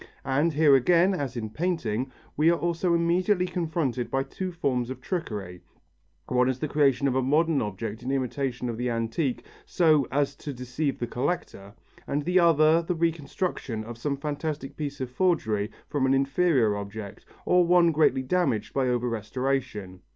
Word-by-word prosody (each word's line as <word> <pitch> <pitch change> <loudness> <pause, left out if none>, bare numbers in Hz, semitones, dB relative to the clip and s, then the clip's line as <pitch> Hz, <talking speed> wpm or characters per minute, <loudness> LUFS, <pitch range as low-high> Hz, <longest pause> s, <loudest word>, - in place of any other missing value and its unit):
And 145 +5 +2
here 150 -1 +5
again, 175 +8 +4
as 140 -8 -3
in 110 -2 -4
painting, 135 -7 -2 0.2
we 155 +3 +4
are 170 - +3
also 170 +1 0
immediately 180 +3 +2
confronted 160 -9 -2
by 135 0 0
two 185 +7 -5
forms 130 -8 -1
of 130 -1 -6
trickery; 105 - -5 0.7
one 125 0 +2
is 130 - -1
the 155 - -2
creation 140 -2 +2
of 130 - +1
a 130 - +2
modern 150 +3 +2
object 105 +2 -4
in 125 - -5
imitation 130 -1 -2
of 115 -2 -3
the 125 0 -1
antique 115 +4 -2 0.2
so 155 -6 +3
as 140 0 0
to 145 - -6
deceive 125 +3 -3
the 120 - -2
collector, 120 - -4 0.3
and 145 +1 -1
the 180 +4 +3
other 165 -1 +5
the 175 +1 -2
reconstruction 165 - -2
of 115 +2 -8
some 140 +2 -2
fantastic 145 0 -4
piece 145 -3 -5
of 125 -1 -4
forgery 115 - +1 0.2
from 135 -3 0
an 135 - +3
inferior 135 -5 +2
object, 100 0 -7 0.2
or 180 0 +4
one 175 -1 +4
greatly 150 -4 +2
damaged 135 - 0
by 135 -2 +1
over 125 0 0
restoration. 115 -4 -3
135 Hz, 170 wpm, -26 LUFS, 120-165 Hz, 0.7 s, here